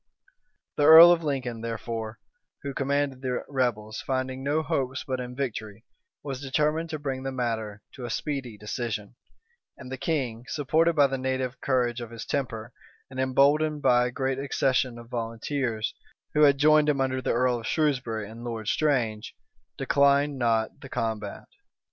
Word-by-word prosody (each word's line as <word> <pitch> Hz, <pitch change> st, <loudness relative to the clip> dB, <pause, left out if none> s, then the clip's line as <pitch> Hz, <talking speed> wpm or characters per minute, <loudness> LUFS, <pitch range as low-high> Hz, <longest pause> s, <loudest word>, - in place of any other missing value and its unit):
The 145 Hz, -, +2 dB
earl 165 Hz, +2 st, +11 dB
of 170 Hz, -1 st, +2 dB
Lincoln, 130 Hz, -6 st, -2 dB
therefore, 115 Hz, -1 st, -4 dB, 0.5 s
who 140 Hz, -1 st, -4 dB
commanded 140 Hz, -1 st, -1 dB
the 125 Hz, -2 st, -2 dB
rebels, 115 Hz, -5 st, -1 dB
finding 130 Hz, 0 st, -3 dB
no 150 Hz, +3 st, +1 dB
hopes 130 Hz, -2 st, -2 dB
but 130 Hz, -1 st, -3 dB
in 125 Hz, 0 st, -6 dB
victory, 110 Hz, -5 st, -5 dB, 0.4 s
was 135 Hz, -2 st, -5 dB
determined 150 Hz, +4 st, 0 dB
to 155 Hz, -, -3 dB
bring 135 Hz, -3 st, -4 dB
the 135 Hz, 0 st, -3 dB
matter 110 Hz, -5 st, -3 dB
to 125 Hz, -, -7 dB
a -, -, -5 dB
speedy 135 Hz, -7 st, -3 dB
decision; 105 Hz, 0 st, -4 dB, 0.6 s
and 130 Hz, -1 st, -10 dB
the 130 Hz, -, -5 dB
king, 125 Hz, -8 st, -2 dB
supported 160 Hz, +4 st, +2 dB
by 145 Hz, -2 st, +6 dB
the 135 Hz, -1 st, -1 dB
native 130 Hz, -1 st, -2 dB
courage 125 Hz, -2 st, 0 dB
of 120 Hz, -, -6 dB
his 115 Hz, -1 st, -8 dB
temper, 115 Hz, -3 st, -3 dB, 0.4 s
and 130 Hz, -, -6 dB
emboldened 145 Hz, +3 st, +2 dB
by 125 Hz, 0 st, +4 dB
a -, -, -5 dB
great 135 Hz, +1 st, -2 dB
accession 130 Hz, -2 st, 0 dB
of 120 Hz, 0 st, -11 dB
volunteers, 115 Hz, 0 st, -2 dB, 0.4 s
who 150 Hz, -, +2 dB
had 140 Hz, -2 st, +6 dB
joined 150 Hz, +1 st, +5 dB
him 140 Hz, -2 st, +1 dB
under 130 Hz, -1 st, 0 dB
the -, -, 0 dB
earl 125 Hz, 0 st, +2 dB
of 115 Hz, -, -7 dB
Shrewsbury 125 Hz, -9 st, 0 dB
and 115 Hz, +2 st, -10 dB
Lord 115 Hz, -3 st, -4 dB
Strange, 120 Hz, -8 st, 0 dB, 0.4 s
declined 140 Hz, 0 st, +3 dB
not 115 Hz, -2 st, 0 dB
the -, -, -10 dB
combat. 110 Hz, -3 st, -3 dB
130 Hz, 165 wpm, -27 LUFS, 115-140 Hz, 0.6 s, earl